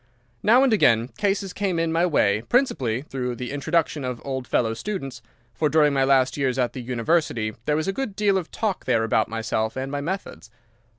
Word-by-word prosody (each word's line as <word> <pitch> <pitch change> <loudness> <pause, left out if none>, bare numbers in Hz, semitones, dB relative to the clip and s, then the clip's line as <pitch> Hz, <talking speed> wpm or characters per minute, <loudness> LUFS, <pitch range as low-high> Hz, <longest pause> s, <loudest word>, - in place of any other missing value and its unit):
Now 245 +5 +5
and 265 -4 +3
again 115 - +3
cases 195 0 -1
came 195 -4 -1
in 165 0 0
my 170 +2 +2
way, 105 - +2
principally 135 - +1
through 125 -4 -4
the 125 0 -5
introduction 155 +1 0
of 125 -2 -4
old 130 -2 -4
fellow 115 -2 +1
students, 135 - -5 0.3
for 150 +6 0
during 150 -2 +4
my 135 -1 +2
last 135 -1 +3
years 135 -2 0
at 125 -2 0
the 130 - -6
University 120 -2 0
there 150 - +1
was 155 +4 -1
a 195 - 0
good 225 -3 -4
deal 205 -2 +2
of 170 - -8
talk 210 -4 -3
there 115 -3 +2
about 110 0 +1
myself 110 0 -2
and 135 +1 -3
my 145 0 -2
methods. 170 - -5
140 Hz, 200 wpm, -24 LUFS, 120-180 Hz, 0.3 s, Now